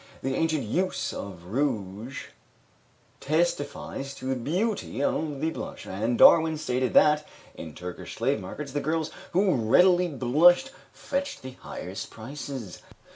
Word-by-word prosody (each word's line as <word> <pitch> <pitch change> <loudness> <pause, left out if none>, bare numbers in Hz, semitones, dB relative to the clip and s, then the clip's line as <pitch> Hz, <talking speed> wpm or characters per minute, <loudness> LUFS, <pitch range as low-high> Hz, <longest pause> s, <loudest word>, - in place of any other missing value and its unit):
The 135 - -1
ancient 160 -1 0
use 180 - -1
of 90 -4 -7
rouge 110 0 -3 0.9
testifies 145 -3 -1
to 130 - -9
the 130 0 0
beauty 175 - -1
of 145 -2 -1
the 160 +1 +1
blush, - - -7
and 110 +5 -1
Darwin 160 -1 +7
stated 130 -4 -1
that, 150 0 +5 0.3
in 80 -3 -9
Turkish 90 0 -7
slave - - 0
markets, 140 +9 -7
the 145 +1 -1
girls 160 0 -1 0.2
who 190 +1 +3
readily 175 +10 +4
blushed 170 - +4 0.2
fetched 280 - -4
the 130 - -6
highest 130 - -7
prices. 130 - -7
140 Hz, 130 wpm, -27 LUFS, 120-160 Hz, 0.9 s, Darwin